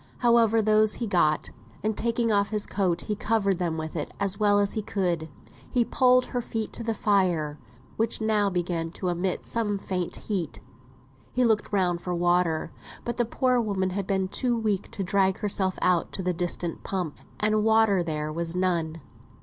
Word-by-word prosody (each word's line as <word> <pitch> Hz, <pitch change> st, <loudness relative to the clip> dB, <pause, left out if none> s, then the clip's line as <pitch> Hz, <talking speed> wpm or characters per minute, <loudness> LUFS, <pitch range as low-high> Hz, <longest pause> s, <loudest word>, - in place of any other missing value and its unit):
However, 230 Hz, -2 st, +4 dB
those 215 Hz, 0 st, +3 dB
he 240 Hz, -, -3 dB
got; 170 Hz, -7 st, +1 dB, 0.3 s
and 215 Hz, 0 st, 0 dB
taking 230 Hz, 0 st, 0 dB
off 200 Hz, -1 st, +2 dB
his 210 Hz, -1 st, 0 dB
coat 180 Hz, -4 st, 0 dB
he 210 Hz, -, -3 dB
covered 200 Hz, -3 st, +1 dB
them 170 Hz, -3 st, -1 dB
with 160 Hz, +1 st, -5 dB
it 150 Hz, -, -3 dB
as 200 Hz, 0 st, 0 dB
well 205 Hz, -1 st, +4 dB
as 200 Hz, -1 st, +2 dB
he 215 Hz, -, -1 dB
could. 175 Hz, -6 st, -1 dB, 0.4 s
He 245 Hz, -3 st, +2 dB
pulled 255 Hz, +1 st, +4 dB
her 245 Hz, -, 0 dB
feet 225 Hz, -2 st, -4 dB
to -, -, -5 dB
the 225 Hz, -1 st, -1 dB
fire, 175 Hz, -8 st, +1 dB, 0.4 s
which 225 Hz, 0 st, 0 dB
now 215 Hz, -2 st, +2 dB
began 175 Hz, -2 st, -2 dB
to 185 Hz, -, -3 dB
emit 175 Hz, +1 st, -1 dB
some 215 Hz, -3 st, -1 dB
faint 185 Hz, -3 st, -3 dB
heat. 185 Hz, -8 st, -3 dB, 0.7 s
He 250 Hz, 0 st, +3 dB
looked 220 Hz, -2 st, +1 dB
round 180 Hz, -4 st, +1 dB
for 180 Hz, -1 st, -3 dB
water, 175 Hz, -2 st, +1 dB, 0.3 s
but 240 Hz, -, -3 dB
the 240 Hz, -, +2 dB
poor 250 Hz, +1 st, +1 dB
woman 190 Hz, -4 st, -1 dB
had 195 Hz, 0 st, -3 dB
been 190 Hz, -1 st, +1 dB
too 240 Hz, +4 st, 0 dB
weak 215 Hz, -4 st, -1 dB
to 195 Hz, -, -4 dB
drag 190 Hz, 0 st, +2 dB
herself 195 Hz, -3 st, -1 dB
out 180 Hz, -2 st, +2 dB
to 190 Hz, -, -3 dB
the 180 Hz, 0 st, 0 dB
distant 175 Hz, -1 st, -3 dB
pump, 180 Hz, -6 st, -3 dB, 0.2 s
and 215 Hz, 0 st, +2 dB
water 220 Hz, -3 st, +4 dB
there 155 Hz, -2 st, -3 dB
was 170 Hz, +1 st, -3 dB
none. 170 Hz, -3 st, 0 dB
195 Hz, 185 wpm, -26 LUFS, 175-220 Hz, 0.7 s, However